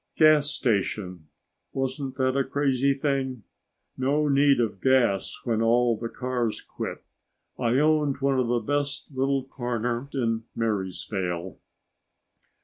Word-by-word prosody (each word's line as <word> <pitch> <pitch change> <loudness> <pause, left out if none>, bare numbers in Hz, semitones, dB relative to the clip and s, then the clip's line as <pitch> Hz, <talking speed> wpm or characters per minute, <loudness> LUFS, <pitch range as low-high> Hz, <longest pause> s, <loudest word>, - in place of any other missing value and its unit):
"Gas 155 -2 +5
station. 95 - -1 0.5
Wasn't 135 0 -3
that 130 0 +1
a 135 - +3
crazy 135 0 +1
thing? 135 -4 -1 0.5
No 145 +4 +1
need 140 -1 +4
of 110 -5 -1
gas 125 -7 +2
when 115 -2 0
all 120 +1 +3
the 115 +1 -5
cars 125 -3 -2
quit. - - -6 0.6
I 120 0 +2
owned 150 -2 +2
one 135 -1 +2
on 125 - +1
the 120 +1 +2
best 145 +1 -2
little 135 0 0
corner 120 0 -3
in 115 -4 -1
Marysvale." 95 -4 -3
130 Hz, 125 wpm, -26 LUFS, 115-140 Hz, 0.6 s, Gas